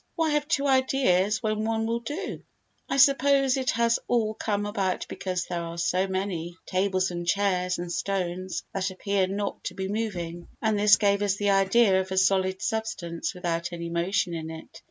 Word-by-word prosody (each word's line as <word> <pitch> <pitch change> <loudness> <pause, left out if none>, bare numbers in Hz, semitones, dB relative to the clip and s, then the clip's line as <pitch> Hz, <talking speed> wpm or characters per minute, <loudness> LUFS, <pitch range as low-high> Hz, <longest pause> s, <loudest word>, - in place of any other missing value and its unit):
Why 325 -2 +1
have 295 0 0
two 285 -3 +1
ideas 260 -7 +2
when 215 0 0
one 225 0 0
will 230 +1 -1
do? 295 - -5 0.5
I - - 0
suppose 275 -1 +5
it 260 -2 -1
has 235 0 +2
all 220 -3 +1
come 205 -1 -2
about 195 -3 -1
because 185 -1 -3
there 175 -1 -3
are 170 0 -6
so 180 +3 +1
many 185 -3 -3
tables 185 -1 0
and 175 0 -5
chairs 180 -2 +1
and 175 0 -5
stones 185 -1 -2
that 190 0 -1
appear 190 0 0
not 200 +2 -3
to - - -4
be 190 -1 -3
moving, 180 -5 -4
and 220 -2 +1
this 210 0 +7
gave 200 -1 +2
us 200 -1 +1
the 205 0 +1
idea 195 0 +4
of 190 - -7
a 190 - -2
solid 190 0 +2
substance 200 -7 -3
without 175 -1 -2
any 170 0 -5
motion 175 +2 0
in 160 -1 -5
it. 160 0 -10
195 Hz, 185 wpm, -26 LUFS, 180-220 Hz, 0.5 s, this